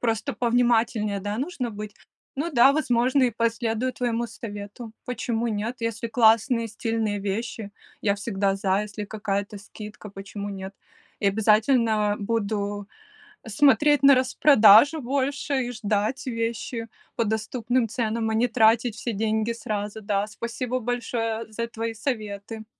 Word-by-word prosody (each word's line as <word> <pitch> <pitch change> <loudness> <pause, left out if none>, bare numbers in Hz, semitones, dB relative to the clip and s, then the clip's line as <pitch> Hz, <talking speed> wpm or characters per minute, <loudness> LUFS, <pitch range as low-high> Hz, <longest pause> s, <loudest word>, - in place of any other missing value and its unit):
Просто 225 -3 -1
повнимательнее, 230 -4 +1
да, 205 +2 -3
нужно 265 -4 -3
быть? 210 -1 -7 0.4
Ну 310 +5 -2
да, 265 -1 +6
возможно, 255 -2 +2
и 250 - +3
последую 230 +1 -1
твоему 235 -1 -1
совету, 220 0 -8
почему 240 -2 -2
нет. 220 +2 -2
Если 230 0 -3
классные, 230 +1 +3
стильные 220 -1 -2
вещи, 205 +1 -4 0.3
я 200 -1 +1
всегда 200 -2 -1
за. 195 0 +1
Если 210 0 -6
какая-то 205 -1 -3
скидка, 210 0 -10
почему 200 +1 -7
нет? 195 -1 -7 0.5
И 200 - +3
обязательно 215 0 +2
буду 205 -1 -2 0.6
смотреть 290 +5 +4
на 275 0 +8
распродажу 255 +1 +6
больше 275 +1 -1
и - - -4
ждать 220 +4 -1
вещи 230 -1 -3 0.3
по 230 - +1
доступным 230 +3 -1
ценам, 225 0 -1
а - - -1
не 230 +3 +2
тратить 230 0 +3
все 235 - -4
деньги 220 +2 0
сразу. 210 -1 -4
Да, 200 -1 0
спасибо 235 +3 -4
большое 230 -2 -2
за 230 +2 -3
твои 230 0 -4
советы. 220 -2 -5
225 Hz, 135 wpm, -25 LUFS, 210-240 Hz, 0.6 s, на